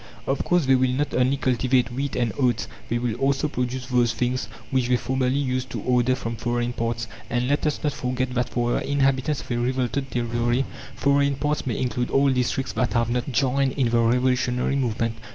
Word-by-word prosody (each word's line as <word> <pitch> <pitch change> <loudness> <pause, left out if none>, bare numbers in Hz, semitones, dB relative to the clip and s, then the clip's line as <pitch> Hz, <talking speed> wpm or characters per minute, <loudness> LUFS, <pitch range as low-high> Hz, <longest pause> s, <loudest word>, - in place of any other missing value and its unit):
Of 135 - 0
course, 175 -4 +2
they 135 - +4
will 130 0 +3
not 140 +4 -1
only 130 +2 +2
cultivate 125 -1 +1
wheat 135 +3 -3
and 120 -3 0
oats 125 -4 +1 0.2
they 120 - +1
will 120 -1 -1
also 135 +3 +1
produce 125 -2 -3
those 120 -2 +2
things 125 -2 -1 0.2
which 130 -2 +1
they 125 0 +3
formerly 130 +1 0
used 130 -2 -1
to - - -4
order 125 0 +2
from 115 -2 -5
foreign 120 +1 -1
parts. 115 -1 -2 0.2
And 120 +1 0
let 145 +3 +1
us 150 - -1
not 150 -2 +1
forget 125 0 -2
that 125 -1 0
for 120 -1 0
the - - -1
inhabitants 135 +1 +1
of - - -10
a 120 - +1
revolted 130 +2 -1
territory, 120 +1 0 0.3
"foreign 140 0 +2
parts" 150 +1 -1
may 120 - -1
include 125 -1 -1
all 140 0 +3
districts 130 +1 -1
that 125 - 0
have 115 -1 +1
not 125 +3 -1
joined 135 +1 +1
in 130 -5 +1
the 120 - +3
revolutionary 125 +2 +2
movement. 115 -3 -1
125 Hz, 205 wpm, -24 LUFS, 120-135 Hz, 0.3 s, they